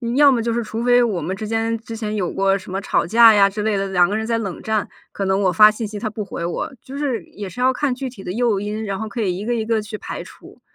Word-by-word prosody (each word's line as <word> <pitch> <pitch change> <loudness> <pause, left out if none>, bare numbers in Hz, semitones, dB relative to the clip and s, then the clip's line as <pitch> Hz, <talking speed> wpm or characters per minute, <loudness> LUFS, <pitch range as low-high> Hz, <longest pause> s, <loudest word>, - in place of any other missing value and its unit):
要 285 0 +7
么 240 -3 +1
就 230 0 -1
是 235 0 -1
除 220 +1 -5
非 245 0 +5
我 200 -8 -1
们 185 +5 -3
之 215 +2 -6
间 225 +1 -1
之 225 -1 -8
前 215 -1 -3
有 185 -5 -1
过 195 0 +2
什 190 -1 -11
么 190 - -2
吵 - - 0
架 225 +3 +7
呀 200 -1 +5
之 210 +1 -4
类 215 0 0
的， 195 0 -1
两 180 -2 +4
个 205 - -1
人 220 0 -2
在 230 0 0
冷 195 -6 -5
战。 220 -2 -1 0.2
可 195 - -3
能 190 +1 +1
我 185 - +3
发 210 +5 +8
信 215 +1 -4
息 205 0 -6
他 220 - -3
不 210 0 -5
回 170 -3 -5
我， 175 +9 -3
就 275 +2 -9
是 255 -10 -2
也 205 -2 -8
是 215 - -11
要 260 +1 +3
看 275 -1 0
具 260 +1 -5
体 205 -6 -12
的 180 - -4
诱 230 -1 +1
因， 210 +1 -4
然 195 -1 -3
后 220 -1 -4
可 230 +3 -4
以 185 -3 -1
1 205 - -5
个 240 - 0
1 225 -2 -1
个 225 -1 +1
去 210 0 -7
排 - - -6
除， - - -16
215 Hz, 325 characters per minute, -20 LUFS, 195-230 Hz, 0.2 s, 发